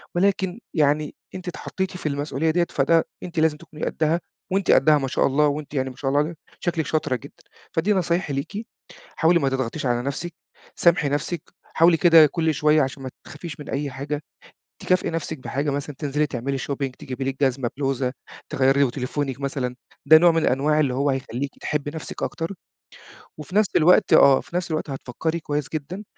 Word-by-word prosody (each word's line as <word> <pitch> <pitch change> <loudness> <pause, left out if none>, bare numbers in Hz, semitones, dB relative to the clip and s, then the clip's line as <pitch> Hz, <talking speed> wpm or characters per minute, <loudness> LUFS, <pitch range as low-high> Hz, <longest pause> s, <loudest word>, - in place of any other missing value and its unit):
ولكن 190 +1 +1 0.2
يعني 150 -1 +2 0.2
أنتِ 185 0 -8
اتحطّيتِ 185 +1 -4
في - - -12
المسؤولية 145 +2 -1
ديّة 170 +1 +1
فده 160 +4 +3 0.2
أنتِ 175 -2 -3
لازم 155 -1 +2
تكوني 155 -1 -7
قدّها 160 +2 0 0.3
وأنتِ 195 -1 +2
قدّها 150 +2 +6
ما 135 -2 -2
شاء - - +2
الله 150 +2 +3
وأنتِ 145 0 -3
يعني 130 -1 -1
ما - - -14
شاء 135 - -2
الله 145 - +3
عل 160 +3 -3 0.2
شكلِك 165 -4 -1
شاطرة 150 -4 0
جدًا، 120 - -11 0.3
فدي 185 +6 +2
نصايحي 175 -4 0
ليكِ 200 - -4 0.5
حاولي 170 +1 +4
ما 135 -3 +1
تضغطيش 130 +2 -2
على 120 -1 +1
نَفْسِك، 140 +6 -4 0.4
سامحي 170 -4 +3
نَفْسِك، 145 +3 -2 0.2
حاولي 165 +1 +4
كده 165 -1 +7
كل 160 +1 0
شوية 150 +1 +3
عشان 135 0 -3
ما 130 - -4 0.2
تخافيش 150 0 -8
من 150 - -9
أي 140 0 -2
حاجة 145 +3 -4 0.6
تكافئي 185 -1 +1
نَفْسِك 160 -1 -4
بحاجة 140 +3 -2
مثلًا 140 0 -4
تنزلي 150 +1 0
تعملي 135 +1 -3
shopping، 140 0 -3
تجيبي 135 -3 -5
لِك 135 +1 -3
جزمة، 130 -2 0
بلوزة، 135 -2 -1 0.4
تغيّري 135 +1 +3
وتليفونِك 135 +1 -3
مثلًا 135 -3 -3 0.3
ده 155 +2 +9
نوع 175 +1 +6
من 165 0 +1
الأنواع 150 +4 +2
اللي 135 -4 +1
هو 140 +2 +1
هيخلّيكِ 135 0 -3
تحبّي 145 -1 -2
نَفْسِك 160 - -7
أكتر 165 +4 -3 0.8
وفي 155 +5 -9
نَفْس 210 -1 +4
الوقت 180 +5 +5
آه، 135 -1 +7
في - - -12
نَفْس 180 -1 -1
الوقت 155 -1 -2
هتفكّري 140 +5 -3
كويس 150 -2 -2
جدًا 165 +7 -4
150 Hz, 185 wpm, -23 LUFS, 135-165 Hz, 0.8 s, ده